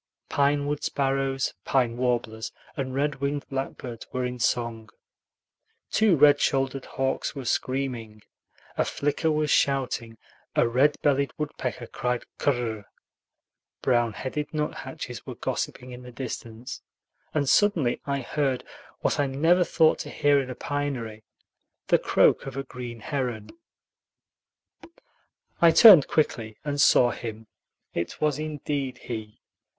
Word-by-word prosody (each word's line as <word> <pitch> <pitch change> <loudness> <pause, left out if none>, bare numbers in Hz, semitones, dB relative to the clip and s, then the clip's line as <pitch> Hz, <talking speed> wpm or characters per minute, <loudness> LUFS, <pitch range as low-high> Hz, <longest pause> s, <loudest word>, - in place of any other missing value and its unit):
Pine 145 0 +2
wood 145 0 -2
sparrows, 135 -1 0
pine 125 -4 +1
warblers, 120 -3 -1 0.2
and 130 -2 -3
red 140 -1 -1
winged 140 +1 -2
blackbirds 130 -3 -5
were 125 0 -1
in 125 0 -4
song; 115 -2 -1 1.0
two 215 -4 +4
red 145 -1 +6
shouldered 135 -1 0
hawks 135 +3 -2
were 135 -2 -6
screaming, 120 -4 -2 0.5
a - - +2
flicker 150 +3 0
was 150 -1 +1
shouting, 125 -4 +1 0.4
a - - +4
red 135 +5 +3
bellied 140 -2 +2
woodpecker 130 -5 -4
cried 125 +1 -2 0.2
kur 145 - +3
r 125 -3 -2
r 110 - -6
r, 100 - -18 1.0
brown 120 -3 +2
headed 145 +6 -4
nuthatches 150 0 -4
were - - -6
gossiping 125 0 -4
in 125 0 -9
the 125 0 -11
distance, 120 -1 -7 0.5
and 145 -2 +1
suddenly 170 -9 +3
I 140 -1 -1
heard, 135 0 -1 0.4
what - - 0
I 145 - +2
never 165 +7 +3
thought 160 -2 +3
to - - -5
hear 145 -1 +3
in 130 - -6
a 125 - -5
pinery, 125 -8 -4 0.6
the - - +5
croak - - +3
of 135 0 -6
a 135 - -2
green 120 -3 -8
heron. 120 -5 -3 2.1
I 170 - +8
turned 175 - +9
quickly 115 -8 0
and 145 -1 0
saw 120 -1 +6
him. 110 -1 -7 0.5
It 85 - -3
was 150 -2 +1
indeed 145 -4 -3
he. 110 -4 -7
135 Hz, 135 wpm, -26 LUFS, 120-145 Hz, 2.1 s, turned